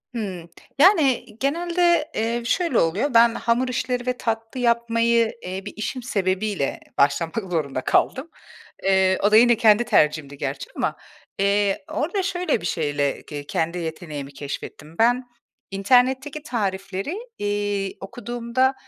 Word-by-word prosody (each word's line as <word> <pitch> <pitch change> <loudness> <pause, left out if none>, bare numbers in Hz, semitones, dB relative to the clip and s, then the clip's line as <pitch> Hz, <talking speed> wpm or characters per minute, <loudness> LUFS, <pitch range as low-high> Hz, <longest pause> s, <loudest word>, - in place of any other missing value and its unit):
Hıı. 185 -6 -5 0.3
Yani, 305 - +5
genelde, 340 +2 +1
eee, 230 +2 -1
şöyle 330 +1 +1
oluyor. 200 - +1
Ben 230 0 +6
hamur 240 +2 +1
işleri 250 0 -2
ve 250 0 0
tatlı 225 +2 -3
yapmayı, 235 -1 +2
eee, 185 +1 -4
bir 205 - -7
işim 245 +4 -4
sebebiyle 195 - -1 0.2
başlamak 145 +4 +2 0.2
zorunda 140 -6 -1
kaldım. 265 - +1 0.5
Eee, 190 -1 +3
o 205 - +4
da 215 - +6
yine 240 +1 +6
kendi 220 0 +5
tercihimdi 150 -9 +1
gerçi 135 0 -4
ama, - - -1 0.4
eee, 200 0 +1
orada 360 +6 -1
şöyle 360 - -1
bir - - -6
şeyle 145 -4 -1
ke 145 -1 -6
kendi 165 +4 -1
yeteneğimi 155 -4 -6
keşfettim. 145 +2 -8
Ben 245 +3 +3 0.5
internetteki 260 +8 +2
tarifleri, 195 - -3 0.2
iii, 205 -1 -2
okuduğumda 240 +5 -1
220 Hz, 130 wpm, -23 LUFS, 185-250 Hz, 0.5 s, Ben